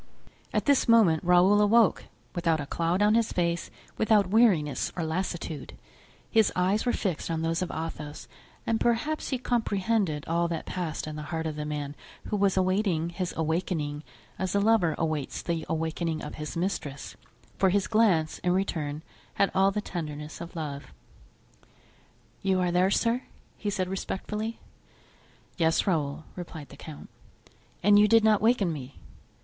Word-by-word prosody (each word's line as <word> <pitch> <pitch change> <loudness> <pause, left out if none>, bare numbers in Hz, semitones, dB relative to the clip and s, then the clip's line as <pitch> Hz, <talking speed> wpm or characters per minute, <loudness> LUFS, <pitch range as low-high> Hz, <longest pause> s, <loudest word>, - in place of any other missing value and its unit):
At - - 0
this 285 -2 +3
moment 215 -9 +5
Raoul 180 +4 +5
awoke, 215 0 +4 0.3
without 165 -3 +1
a 145 - -3
cloud 170 +6 0
on 210 +1 +4
his 230 0 +2
face 170 -1 -1 0.3
without 210 -4 +3
weariness 195 - +3
or 170 - -1
lassitude; 165 -1 -4 0.5
his 220 -3 +4
eyes 190 +6 +1
were - - +4
fixed 185 -9 -2
on 160 -1 -1
those 165 +1 0
of 180 - -2
Athos 155 -2 -6 0.4
and 225 -1 +1
perhaps 240 +7 0
he 260 - 0
comprehended 210 - 0
all 170 +1 +1
that 165 -2 -4
passed 170 -4 -3
in 155 0 -6
the - - -5
heart 160 -1 -2
of 155 -1 -3
the 150 0 -4
man 145 -1 -4 0.3
who - - 0
was 200 -2 +2
awaiting 185 -3 +1
his 180 0 -3
awakening 160 -2 -1 0.4
as 190 +1 -1
a - - +4
lover 205 -5 +3
awaits 155 -4 -2
the 165 -2 -2
awakening 160 0 -2
of - - -6
his 150 +1 -6
mistress, 160 -6 -3 0.4
for 190 - +4
his 195 +1 +2
glance, 195 -9 +2
in 180 - +1
return, 160 -6 -2 0.3
had 200 - +2
all 190 +1 +4
the 210 +1 -2
tenderness 150 -4 -6
of 170 +1 -8
love. 145 -3 -5 1.5
"You 190 -1 +1
are 180 -1 +1
there, 180 +2 +3
sir?" 230 +4 +1 0.3
he 210 - -3
said, 190 -2 -1
respectfully. 210 +4 -4 1.0
"Yes, 165 -2 +2
Raoul," 155 -6 -1
replied 165 -5 -8
the - - -12
count. 155 -2 -10 0.8
"And 205 +2 +6
you 210 - +6
did 225 0 +5
not 215 -2 +5
awaken 215 -6 +3
me?" 135 -2 -8
180 Hz, 160 wpm, -28 LUFS, 160-205 Hz, 1.5 s, And